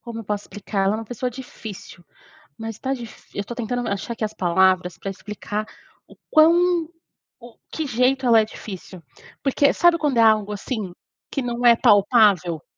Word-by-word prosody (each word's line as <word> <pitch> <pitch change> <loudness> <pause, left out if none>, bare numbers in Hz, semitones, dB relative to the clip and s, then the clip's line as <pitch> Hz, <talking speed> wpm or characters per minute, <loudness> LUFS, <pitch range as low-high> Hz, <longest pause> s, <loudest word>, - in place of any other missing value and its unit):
Como 235 -2 -8
eu 225 - -7
posso 205 0 -3
explicar? 195 -1 -2
É - - +3
uma 220 +2 -2
pessoa 245 +3 -4
difícil, 220 -8 -10 0.5
mas 225 -1 -6
está 265 +3 -2
difi 235 -4 -12
eu - - -1
estou 240 - -8
tentando 245 +1 -3
achar 200 +4 -3
aqui 220 - -3
as 215 - -3
palavras 180 0 +2
para 195 - -5
explicar 210 +2 -5 0.4
o - - -17
quão 335 +1 +4 0.5
o 240 -1 -14 0.2
que 315 - -3
jeito 260 +1 +1
ela 230 -2 +6
é 215 - 0
difícil. 190 -4 -10 0.4
Porque 280 +1 +2
sabe 345 -1 +4
quando 290 -6 0
é 230 - +5
algo 215 -2 +3
assim, 205 -3 -5 0.4
que 275 - -2
não 240 0 -1
é 235 - +7
palpável? 205 - +3
225 Hz, 180 wpm, -22 LUFS, 200-250 Hz, 0.5 s, é